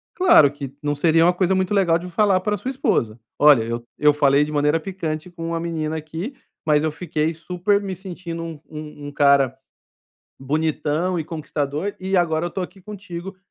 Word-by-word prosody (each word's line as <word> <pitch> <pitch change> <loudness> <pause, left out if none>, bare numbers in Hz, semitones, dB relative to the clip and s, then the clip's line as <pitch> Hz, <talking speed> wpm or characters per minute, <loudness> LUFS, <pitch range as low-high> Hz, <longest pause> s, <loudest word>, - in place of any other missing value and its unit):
Claro 155 - +6
que 140 -2 -8
não 145 0 -1
seria 165 +2 +4
uma 180 - +4
coisa 185 +1 +1
muito 190 +2 0
legal 175 -5 +3
de 180 +2 -8
falar 195 +1 +3
para 210 +2 0
a - - -6
sua 260 - -5
esposa: 120 - 0 0.2
"olha, 145 -6 +7
eu. 115 +1 -4
eu 150 0 +5
falei 145 0 +4
de 150 - -4
maneira 150 +2 +2
picante 165 -2 -4
com 165 -1 -7
uma 165 0 -1
menina 160 -2 -3
aqui, 160 - -6 0.3
mas 150 -1 +3
eu 155 - 0
fiquei 160 -1 -2
super 180 +5 0
me 190 -2 -4
sentindo 175 -2 -7
um 165 -3 -7
um 150 -2 -8
cara 140 -2 +4 0.9
bonitão 155 +4 -1
e 160 - -3
conquistador 155 +3 -3
e 190 +1 -1
agora 165 -1 +1
eu - - -2
estou 190 +1 -4
aqui 190 +2 -13
contigo 195 -2 -8
165 Hz, 190 wpm, -22 LUFS, 150-185 Hz, 0.9 s, olha